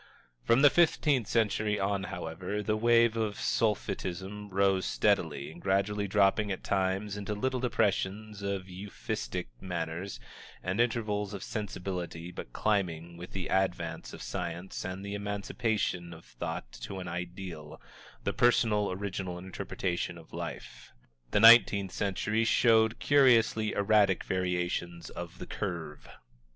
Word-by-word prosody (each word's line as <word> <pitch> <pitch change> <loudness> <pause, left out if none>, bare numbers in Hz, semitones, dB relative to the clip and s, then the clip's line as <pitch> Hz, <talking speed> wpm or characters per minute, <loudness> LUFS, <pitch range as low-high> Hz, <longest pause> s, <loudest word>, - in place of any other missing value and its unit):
From 115 +4 +3
the 145 - +8
fifteenth 150 -8 +3
century 105 -2 +1
on, 100 0 0
however, 95 +3 -4
the 105 +1 +1
wave 115 0 +4
of 110 -2 -1
Sulphitism 100 -1 -1
rose 95 -1 +2
steadily, 70 +3 +1
gradually 100 +4 0
dropping 100 +1 +3
at 95 - -4
times 95 +1 0
into 105 +1 -4
little 130 +4 -1
depressions 105 -3 -1
of 100 -1 -3
Euphuistic 90 -11 -5
manners 85 +1 -4 0.4
and 95 +5 +1
intervals 105 -4 -1
of 100 - -6
"sensibility" 90 -4 -4
but 75 - -8
climbing, 85 - -1
with 85 +1 -10
the 95 -2 -3
advance 90 -4 -1
of - - -9
science 85 +3 -4
and 95 +1 -5
the 100 - -4
emancipation 100 -3 -2
of 80 - -15
thought - - -6
to 95 - -7
an 90 - -6
ideal 90 -3 -6 0.4
the - - -1
personal, 110 -4 +3
original 95 -2 -4
interpretation 90 -1 -3
of 80 -1 -15
life. - - -7 0.4
The 105 - +2
nineteenth 110 -4 +8
century 105 +2 0
showed 110 0 +4
curiously 115 -6 +4
erratic 100 -2 +3
variations 90 -1 -2
of 85 +1 -7
the - - -7
curve. 85 -7 -5
100 Hz, 130 wpm, -30 LUFS, 90-105 Hz, 0.4 s, the